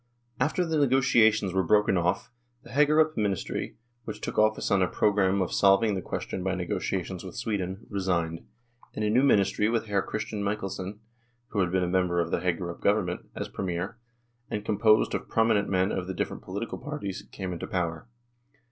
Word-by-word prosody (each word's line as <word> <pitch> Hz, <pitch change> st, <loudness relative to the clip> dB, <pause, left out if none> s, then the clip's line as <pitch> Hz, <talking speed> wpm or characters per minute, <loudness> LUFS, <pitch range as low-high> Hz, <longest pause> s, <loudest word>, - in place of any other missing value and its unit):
After 155 Hz, +7 st, +1 dB
the 160 Hz, -2 st, 0 dB
negotiations 120 Hz, -8 st, +4 dB
were 95 Hz, -, +3 dB
broken 105 Hz, +2 st, +3 dB
off, 90 Hz, +2 st, 0 dB, 0.3 s
the -, -, -13 dB
Hagerup 155 Hz, +2 st, +4 dB
ministry, 100 Hz, -4 st, -2 dB, 0.3 s
which 105 Hz, -2 st, -6 dB
took -, -, -3 dB
office 110 Hz, 0 st, +2 dB
on 100 Hz, -1 st, +4 dB
a 90 Hz, -, +3 dB
programme 100 Hz, -2 st, +2 dB
of 90 Hz, -, -4 dB
solving 100 Hz, +2 st, +4 dB
the 95 Hz, -, -2 dB
question 90 Hz, -, -4 dB
by 95 Hz, -1 st, 0 dB
negotiations 90 Hz, 0 st, -3 dB
with 95 Hz, -2 st, -8 dB
Sweden, 100 Hz, -4 st, -3 dB
resigned, 90 Hz, -5 st, -1 dB, 0.5 s
and 105 Hz, -, -1 dB
a 105 Hz, -, +1 dB
new 125 Hz, +4 st, +4 dB
ministry 105 Hz, -5 st, +3 dB
with 115 Hz, -1 st, 0 dB
Hr. 100 Hz, -1 st, +1 dB
Christian 105 Hz, +1 st, -3 dB
Michelsen 100 Hz, 0 st, -3 dB, 0.5 s
(who 105 Hz, -, -2 dB
had 90 Hz, -3 st, +1 dB
been 95 Hz, 0 st, +2 dB
a -, -, 0 dB
member 90 Hz, -1 st, +1 dB
of 85 Hz, -1 st, -1 dB
the -, -, +1 dB
Hagerup 85 Hz, -1 st, -2 dB
Government) 100 Hz, -4 st, 0 dB
as -, -, -4 dB
Premier, 95 Hz, +4 st, -4 dB, 0.5 s
and 105 Hz, 0 st, -3 dB
composed 110 Hz, +1 st, +3 dB
of -, -, -3 dB
prominent 110 Hz, -2 st, +2 dB
men 95 Hz, +1 st, +2 dB
of 90 Hz, -1 st, -3 dB
the 95 Hz, -, -4 dB
different -, -, -3 dB
political 100 Hz, +5 st, -5 dB
parties, 130 Hz, -9 st, -5 dB
came 95 Hz, -2 st, -4 dB
into 85 Hz, -, -5 dB
power. 85 Hz, +1 st, -2 dB
100 Hz, 180 wpm, -27 LUFS, 90-110 Hz, 0.5 s, negotiations